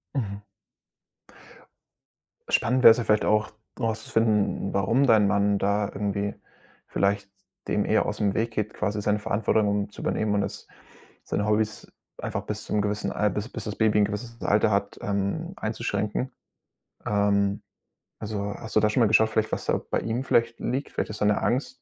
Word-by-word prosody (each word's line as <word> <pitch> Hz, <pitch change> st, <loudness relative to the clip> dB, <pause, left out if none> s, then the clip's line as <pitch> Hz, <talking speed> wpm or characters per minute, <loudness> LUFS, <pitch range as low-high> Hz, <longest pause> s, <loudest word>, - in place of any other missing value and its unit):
Mhm. 100 Hz, -6 st, -3 dB, 2.1 s
Spannend 125 Hz, +2 st, +2 dB
wäre -, -, +11 dB
es 110 Hz, -, +3 dB
ja 120 Hz, -, -1 dB
vielleicht 105 Hz, -1 st, +2 dB
auch, 105 Hz, 0 st, +2 dB, 0.3 s
rauszufinden, 110 Hz, -2 st, +1 dB
n -, -, -7 dB
warum 115 Hz, +8 st, +2 dB
dein 110 Hz, -4 st, +5 dB
Mann 100 Hz, 0 st, +2 dB
da 100 Hz, +1 st, +1 dB
irgendwie 100 Hz, 0 st, -2 dB, 0.5 s
vielleicht 100 Hz, 0 st, 0 dB, 0.4 s
dem -, -, +1 dB
eher -, -, +2 dB
ausm 100 Hz, -2 st, 0 dB
Weg 115 Hz, +2 st, -1 dB
geht, 105 Hz, -1 st, -3 dB
quasi 105 Hz, 0 st, -2 dB
seine 105 Hz, +1 st, +1 dB
Verantwortung 105 Hz, -1 st, +1 dB
zu -, -, -10 dB
übernehmen 110 Hz, -1 st, 0 dB
und 100 Hz, -, +2 dB
das, -, -, -5 dB, 0.6 s
seine 100 Hz, -, -1 dB
Hobbys 110 Hz, 0 st, -1 dB, 0.3 s
einfach -, -, -3 dB
bis -, -, -5 dB
zum 105 Hz, -, 0 dB
gewissen 105 Hz, +1 st, -2 dB
Al 105 Hz, -, +1 dB
bis 105 Hz, +3 st, -3 dB
bis 110 Hz, -, -6 dB
das 105 Hz, -2 st, -5 dB
Baby 110 Hz, -1 st, +3 dB
'n -, -, +5 dB
gewisses 115 Hz, +3 st, -6 dB
Alter 105 Hz, +1 st, +3 dB
hat, 100 Hz, 0 st, -1 dB
ähm, 100 Hz, -, -2 dB
einzuschränken. 110 Hz, +3 st, -2 dB, 0.7 s
Ähm, 100 Hz, -1 st, +1 dB, 0.6 s
also, 105 Hz, -1 st, -3 dB
hast 110 Hz, -, -9 dB
du -, -, +7 dB
da 105 Hz, -, +3 dB
schon 105 Hz, -, 0 dB
mal 115 Hz, -, +6 dB
geschaut 110 Hz, +1 st, +4 dB
vielleicht, 110 Hz, 0 st, 0 dB
was -, -, -2 dB
da -, -, +1 dB
bei -, -, +1 dB
ihm 115 Hz, +3 st, -2 dB
vielleicht 115 Hz, -2 st, +2 dB
liegt? 135 Hz, +3 st, -2 dB
Vielleicht -, -, -2 dB
ist 105 Hz, -, -8 dB
da -, -, +3 dB
'ne 105 Hz, 0 st, +2 dB
Angst, 130 Hz, 0 st, -1 dB
105 Hz, 175 wpm, -26 LUFS, 100-110 Hz, 2.1 s, wäre